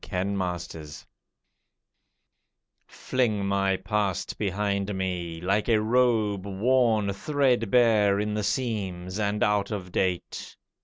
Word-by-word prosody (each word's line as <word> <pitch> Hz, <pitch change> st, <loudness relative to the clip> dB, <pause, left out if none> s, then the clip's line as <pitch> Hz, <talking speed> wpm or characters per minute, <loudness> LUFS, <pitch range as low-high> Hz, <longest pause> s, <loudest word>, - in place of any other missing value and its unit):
THE -, -, -12 dB, 0.3 s
PAST 85 Hz, -5 st, -5 dB, 1.8 s
Fling 110 Hz, -6 st, -1 dB
my 100 Hz, -1 st, +1 dB
past 100 Hz, -1 st, -2 dB
behind 100 Hz, 0 st, -1 dB
me, 90 Hz, -3 st, -3 dB
like 100 Hz, +5 st, 0 dB
a 110 Hz, -2 st, +4 dB
robe 110 Hz, -4 st, +1 dB
Worn 110 Hz, 0 st, +2 dB
threadbare 115 Hz, -5 st, +2 dB
in 105 Hz, 0 st, -1 dB
the 105 Hz, -, -1 dB
seams, 100 Hz, -6 st, -2 dB
and 105 Hz, 0 st, 0 dB
out 105 Hz, -1 st, +1 dB
of 95 Hz, -4 st, -5 dB
date. 90 Hz, -2 st, -2 dB
100 Hz, 105 wpm, -26 LUFS, 95-110 Hz, 1.8 s, a